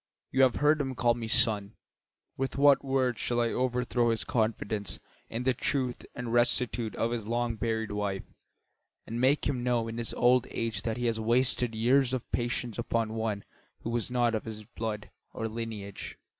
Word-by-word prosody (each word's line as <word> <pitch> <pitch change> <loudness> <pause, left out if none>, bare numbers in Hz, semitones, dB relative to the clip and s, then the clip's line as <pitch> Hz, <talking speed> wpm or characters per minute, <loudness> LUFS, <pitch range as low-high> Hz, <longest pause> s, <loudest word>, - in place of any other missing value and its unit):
You 135 - +3
have 130 -3 +5
heard 150 +1 +3
him 135 -2 -3
call 120 0 +3
me 115 -1 -5
son; 110 -4 +3 0.6
with 135 +1 -3
what 140 0 +6
words 130 -4 +1
shall 120 0 0
I 120 -1 +2
overthrow 125 -1 +1
his 115 -1 +1
confidence 110 -3 -1 0.3
in 115 +2 -3
the 130 0 +3
truth 125 0 -2
and 120 -1 -4
rectitude 120 -1 +1
of 115 - 0
his 115 -3 -3
long 120 0 0
buried 110 -1 -1
wife 100 -2 -2 0.8
and 115 +2 -3
make 135 +3 +3
him 130 -4 0
know 120 -2 +1
in 115 +1 -5
his 115 - -3
old 125 0 +4
age 115 -3 -2
that 110 +1 -2
he 120 - -2
has 115 -1 +1
wasted 120 +1 +2
years 125 +3 +3
of 125 - -5
patience 120 -1 -1
upon 115 -2 0
one 110 -3 -2 0.4
who 115 - -3
was 120 0 0
not 120 -2 +2
of 110 - -2
his 110 -1 -7
blood 105 0 -5 0.2
or 115 - -2
lineage? 110 -3 -6
120 Hz, 185 wpm, -29 LUFS, 110-125 Hz, 0.8 s, what